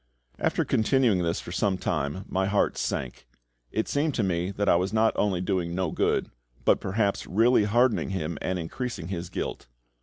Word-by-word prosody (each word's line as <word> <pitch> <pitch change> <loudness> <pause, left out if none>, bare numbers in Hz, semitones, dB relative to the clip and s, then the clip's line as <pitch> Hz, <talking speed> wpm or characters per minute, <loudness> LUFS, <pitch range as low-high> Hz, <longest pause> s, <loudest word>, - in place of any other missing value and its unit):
After - - +1
continuing 110 -4 +2
this 85 0 0
for - - -8
some 95 0 +1
time, 75 +2 -2
my 95 0 0
heart 100 +1 +1
sank. 60 -2 -3 0.4
It 110 - -1
seemed 145 0 0
to 115 - +1
me 90 -1 0
that 100 +1 -2
I - - +6
was 90 +3 0
not 110 +1 +3
only 95 -4 +1
doing 90 -3 -1
no 90 -3 -1
good, - - 0 0.3
but - - +4
perhaps 100 +1 0
really 115 +2 +4
hardening 120 +2 +2
him 85 -5 -3
and 90 0 -1
increasing 90 +1 -5
his 90 -2 -4
guilt. 85 - -4
95 Hz, 180 wpm, -27 LUFS, 85-110 Hz, 0.4 s, I